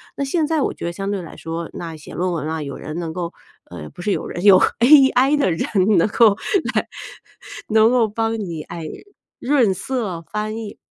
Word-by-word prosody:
那 280 - -2
现 310 +2 0
在 315 -2 0
我 - - 0
觉 - - -7
得 170 - -2
相 195 +3 -5
对 195 -2 -2
来 165 - -11
说， 165 +1 -5
那 165 -2 -6
写 150 - -12
论 180 +1 -1
文 155 -2 -3
啊， 160 -1 -3
有 140 - -6
人 155 +2 -7
能 165 -2 -4
够 170 -1 -4 0.4
呃， 80 -3 -8
不 - - -12
是 205 - -1
有 - - -2
人 175 - -6
有 195 -2 +8 0.2
AI 270 +1 +5
的 235 -11 +2
人 165 - -1 0.3
能 170 - +4
够 215 -2 +5 0.4
来， - - +1 0.8
能 220 +1 +5
够 240 -3 +3
帮 225 +1 -2
你， 170 -6 -5
哎， 165 -2 -8 0.5
润 250 -8 +2
色 195 -6 -4
翻 215 +1 -3
译。 220 -2 -7
200 Hz, 225 characters per minute, -20 LUFS, 170-235 Hz, 0.8 s, 有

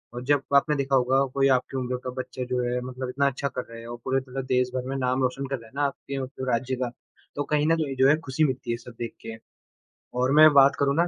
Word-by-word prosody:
अ, - - -3
जब 140 +2 +2
आपने 150 +2 +4
देखा 135 -1 0
होगा 130 +2 +3
कोई 135 0 +3
आपकी 130 +1 -3
उम्र 125 0 -2
का 130 - -4
बच्चा 130 0 -5
जो 125 0 0
है 125 +1 -1
मतलब 130 0 -5
इतना 140 +2 +1
अच्छा 140 +1 -2
कर 130 - -4
रहा 115 - -10
है 115 - -10
और 120 0 -6
पूरे 135 0 +1
तरह 130 +1 -5
देश 125 0 +2
भर 125 0 -2
में 135 - -2
नाम 130 0 0
रोशन 130 +2 -1
कर 135 - -2
रहा 115 - -14
है 110 - -21
ना 145 - 0
आपके 140 0 -4
वो 130 - -3 0.2
राज्य 125 +2 0
का, 125 -1 -3 0.4
तो 145 - -1
कहीं 150 +1 +1
न 165 - +4
कहीं 140 -3 -2
जो 130 +1 +4
है 150 - +6
खुशी 135 +4 +1
मिलती 130 -4 -1
है - - +2
ये 115 - -3
सब 125 0 -12
देख 115 -1 -4
के। 115 0 -6 0.8
और 130 +1 +2
मैं 155 0 +9
बात 140 0 +6
करूँ 140 0 +2
ना, 170 +2 +3
130 Hz, 280 wpm, -26 LUFS, 125-140 Hz, 0.8 s, मैं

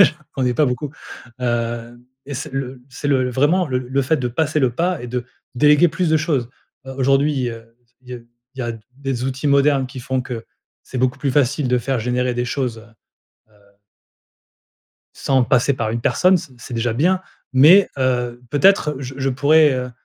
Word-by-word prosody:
J'en 185 - +6 0.2
connais 125 -2 0
pas 150 +1 +3
beaucoup. 135 +3 -3 0.5
Hem 120 0 -3 0.2
et 140 - -6
c'est 145 +4 -5
le 130 -2 -5
c'est 140 +2 -6
le, 130 -2 +2
vraiment, 150 +7 +2
le 125 -1 0
le 130 +2 -1
fait 155 +4 +1
de 125 - -2
passer 155 +4 0
le 125 -4 +1
pas 175 -2 -1
et - - -6
de 125 0 -3 0.3
déléguer 150 +5 +5
plus 165 +2 -1
de 160 - +4
choses. 145 -7 -1 0.4
Aujourd'hui, 135 0 +1
heu, 115 0 -12 0.2
il 130 - -21
y - - -4
a 125 - -7 0.4
il - - -16
y - - -1
a 120 0 -3 0.2
des 135 -3 -3
outils 135 +2 -3
modernes 140 -1 +3
qui 130 0 -9
font 130 +1 -2
que 120 -3 -7 0.4
c'est 130 - -6
beaucoup 130 0 0
plus 140 - -1
facile 140 0 +1
de 125 - +2
faire 130 +1 -2
générer 125 +2 0
des 120 - -1
choses, 125 -4 -2
heu 115 0 -20 0.4
heu - - -25 1.6
sans 130 -2 +1
passer 130 +1 +2
par 115 -4 -2
une 115 - -2
personne, 180 +9 +3
c 140 - -11
c'est 125 - -10
déjà 115 0 0
bien, 180 +9 +2 0.3
mais, 160 +10 +7
heu, 125 -2 -1
peut-être 150 -1 +3
je 135 -1 -7
je 135 0 0
pourrais, 150 +3 +4
heu, 125 0 -3
130 Hz, 195 wpm, -20 LUFS, 125-145 Hz, 1.6 s, mais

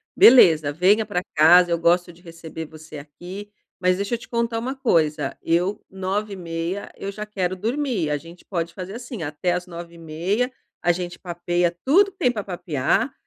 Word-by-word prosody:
beleza, 160 - +7
venha 195 +8 +3
pra 180 -2 -1
casa, 175 +3 +7
eu 170 - +2
gosto 175 +1 +2
de 170 - -20
receber 165 -2 -8
você 155 0 -11
aqui. 175 +8 -9 0.3
Mas 180 0 +3
deixa 200 +4 -3
eu - - -4
te - - -12
contar 235 -1 -1
uma 260 +4 -3
coisa, 160 - +1
eu 175 +5 0
21h30, 190 -2 -4
eu 200 - -4
já 210 +1 -6
quero 185 -3 -2
dormir. 225 - -1
A 150 - 0
gente 170 +4 -13
pode 170 -3 -3
fazer 185 +2 -7
assim, 235 -7 -6
até 155 +4 -1
às 180 +1 -3
21h30, 170 +7 -3 0.3
a 175 - +4
gente 180 0 -5
papeia 175 0 -1
tudo 390 +9 +5
que 390 - -38
tem 250 - +2
pra 215 -3 -3
papiar, 180 - -1
180 Hz, 175 wpm, -23 LUFS, 165-210 Hz, 0.3 s, beleza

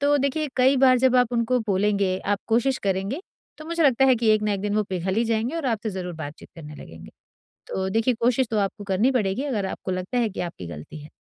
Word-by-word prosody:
तो 290 +1 +3
देखिए 285 +2 -1
कई 260 +2 +4
बार 255 -1 +5
जब 255 0 +3
आप 250 -1 +3
उनको 240 +1 +1
बोलेंगे, 195 -1 +1
आप 205 0 -1
कोशिश 245 +4 +2
करेंगे 195 - -1 0.4
तो 310 - -9
मुझे 335 0 -1
लगता 270 -1 +4
है 260 - +6
कि 230 -1 0
एक 215 - -1
ना 210 -1 +1
एक 195 - -4
दिन 205 0 -2
वो 215 - +3
पिघल 185 0 -2
ही 230 - +2
जाएँगे 230 +6 -1
और 325 -4 -3
आपसे 225 -2 -1
ज़रूर 180 -2 -5
बातचीत 155 -2 -9
करने 150 -2 -9
लगेंगे। 80 - -12 0.6
तो 190 0 -2
देखिए 225 +5 +1
कोशिश 250 +2 +2
तो 220 - 0
आपको 205 +1 -2
करनी 200 +7 +2
पड़ेगी 220 +1 0
अगर 220 -9 -1
आपको 190 - -5
लगता 185 +7 -2
है 230 -3 +1
कि 195 - -6
आपकी 170 - -5
गलती 80 - -9
है। 150 - -11
220 Hz, 240 wpm, -24 LUFS, 190-255 Hz, 0.6 s, है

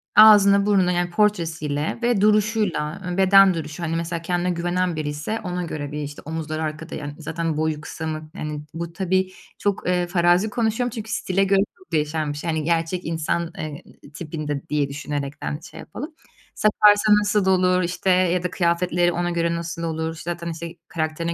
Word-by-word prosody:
ağzını, 200 -2 +8
burnunu 190 -3 +3
yani 175 0 0
portresiyle 165 -5 0
ve 235 -4 +2
duruşuyla, 210 -7 +1
ııı, 180 +1 -3
beden 195 0 +6
duruşu, 160 0 -5
hani 165 0 -1
mesela 170 0 -3
kendine 175 +1 -1
güvenen 175 0 -1
biriyse 150 +8 -3
ona 180 -1 -3
göre 145 -4 -5
bir 150 0 -4
işte 145 0 -8
omuzları 160 0 -3
arkada, 155 +1 -5
yani, 145 -1 -6
zaten 160 0 -3
boyu 155 -1 -1
kısa 160 +2 -6
mı, 155 0 -5
yani 150 -1 -4
bu 170 0 -5
tabii 190 0 0 0.3
çok, 200 -3 -1
eee, 180 -1 +1
farazi 175 +3 +3
konuşuyorum 235 +1 0
çünkü 220 0 -6
stile 195 -2 +1
göre 195 0 +3 0.2
çok 375 - -22
değişen 150 -1 0
bir - - -8
şey. 165 - -4
Yani 160 -1 -1
gerçek 165 +2 0
insan, 165 +1 -2
eee, 150 -2 -6 0.2
i 145 - -14
tipinde 150 -3 -5
diye 145 -2 0
düşünerekten 145 +1 -4
şey - - -11
yapalım. 300 +6 -8 0.4
Saparsa 210 0 +4
nasıl 205 -1 +1
olur, 185 -1 +3
işte, 175 +2 -2
ya 180 -1 +3
da 180 - -1
kıyafetleri 175 0 +1
ona 175 0 -1
göre 170 0 0
nasıl 170 0 -5
olur, 160 0 -3
zaten 170 0 -4
işte 165 +1 -7
karakterine 165 +1 -2
170 Hz, 175 wpm, -23 LUFS, 155-190 Hz, 0.4 s, ağzını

